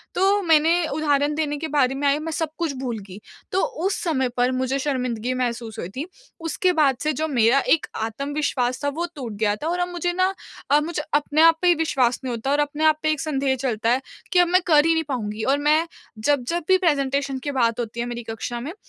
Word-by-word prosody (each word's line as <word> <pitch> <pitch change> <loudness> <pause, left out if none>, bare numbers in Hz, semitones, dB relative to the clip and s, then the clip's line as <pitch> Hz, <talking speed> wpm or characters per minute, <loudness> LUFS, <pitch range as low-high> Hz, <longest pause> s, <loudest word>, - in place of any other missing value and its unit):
तो 395 +2 +3
मैंने 325 +1 +3
उदाहरण 290 -1 +1
देने 295 -1 -1
के 320 +2 -4
बारे 270 -3 +1
में 285 +1 0
आई 280 +1 +3
मैं 320 +1 -4
सब 320 -1 -1
कुछ 330 -4 -1
भूल 245 -4 -3
गई, 190 +1 -10 0.3
तो 380 - +1 0.2
उस 390 - +1
समय 265 -7 0
पर 245 +1 +2
मुझे 260 +1 -1
शर्मिंदगी 255 -3 -2
महसूस 235 -3 -3
हुई 170 - -5
थी। 280 +5 -3 0.4
उसके 360 +3 0
बाद 285 -6 +3
से 305 - +1
जो 315 +3 -2
मेरा 245 -1 +3 0.2
एक 325 - -8 0.2
आत्मविश्वास 275 +1 -2
था 285 - +1
वो 345 - 0
टूट 245 -6 -6
गया 210 -1 +2
था 300 - -5
और 350 +2 -1
अब 355 - 0
मुझे 350 0 -2
ना 370 +2 +1 0.4
अब 295 +1 +5
मुझे 330 -2 -3
अपने 295 +1 +2
आप 330 0 +6
पर 350 -1 +5
विश्वास 260 -7 +1
नहीं 255 -2 -3
होता 235 +4 -2
और 290 - +2
अपने 295 +1 0
आप 310 -1 +4
पर 310 - +2
एक 310 -2 0
संदेह 275 -3 0
चलता 235 -3 -1
है, 255 +2 +2 0.3
कि 360 - +5
अब 355 - +5
मैं 365 +2 +3
कर 300 -2 +5
ही 330 - +4
नहीं 320 - 0
पाऊँगी 220 -4 -3
और 275 +2 +2
मैं 305 +3 +2 0.3
जब-जब 290 +7 0
भी 375 - +6
प्रेजेंटेशन 275 -5 0
की 285 - -2
बात 235 -4 +1
होती 235 0 -4
है 235 - -2
मेरी 240 0 -5
कक्षा 235 +2 -4
में 285 +7 -6
285 Hz, 230 wpm, -23 LUFS, 250-320 Hz, 0.4 s, आप